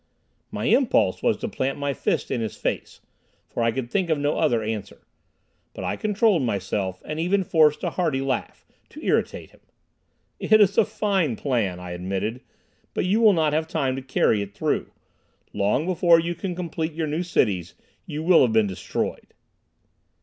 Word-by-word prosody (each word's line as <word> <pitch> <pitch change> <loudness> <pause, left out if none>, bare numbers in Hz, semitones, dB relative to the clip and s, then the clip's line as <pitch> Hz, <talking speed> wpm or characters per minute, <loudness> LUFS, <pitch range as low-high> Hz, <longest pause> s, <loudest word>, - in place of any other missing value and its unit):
My - - -4
impulse 265 -3 +3
was 230 - +2
to 230 - -4
plant 135 - -2
my 145 -1 -1
fist - - -1
in 120 - -1
his 110 - -4
face, - - -4 0.5
for - - -4
I 115 0 +3
could 120 0 -4
think 185 -3 0
of 160 - +2
no 145 +1 0
other 120 -8 +2
answer. 110 -2 -5 0.7
But - - -6
I - - -1
controlled 210 -4 +2
myself, 95 -4 -2
and 155 +1 -4
even 190 +4 +1
forced 155 -4 +3
a - - -1
hearty 160 -7 0
laugh, 135 -2 -3 0.2
to - - -11
irritate - - -1
him. - - -22 0.8
"It 215 0 +4
is 200 -1 +4
a 225 - +5
fine 200 - 0
plan," 110 -9 -1
I 90 0 -8
admitted, 95 +7 -3 0.5
"but - - 0
you 205 +5 +2
will 215 -3 +7
not 155 -4 +1
have 160 +1 0
time 140 -6 -1
to 135 - -5
carry 120 -5 +1
it 100 0 -7
through. - - -1 0.6
Long 105 +9 +1
before 175 -2 +4
you 170 +1 -2
can 180 0 -5
complete 165 -2 -3
your 160 0 -2
new 155 +3 -2
cities 100 - 0 0.3
you 150 +1 -4
will 175 0 +6
have 120 -3 +3
been 110 -1 +4
destroyed." 95 -3 -4
150 Hz, 180 wpm, -24 LUFS, 110-180 Hz, 0.8 s, will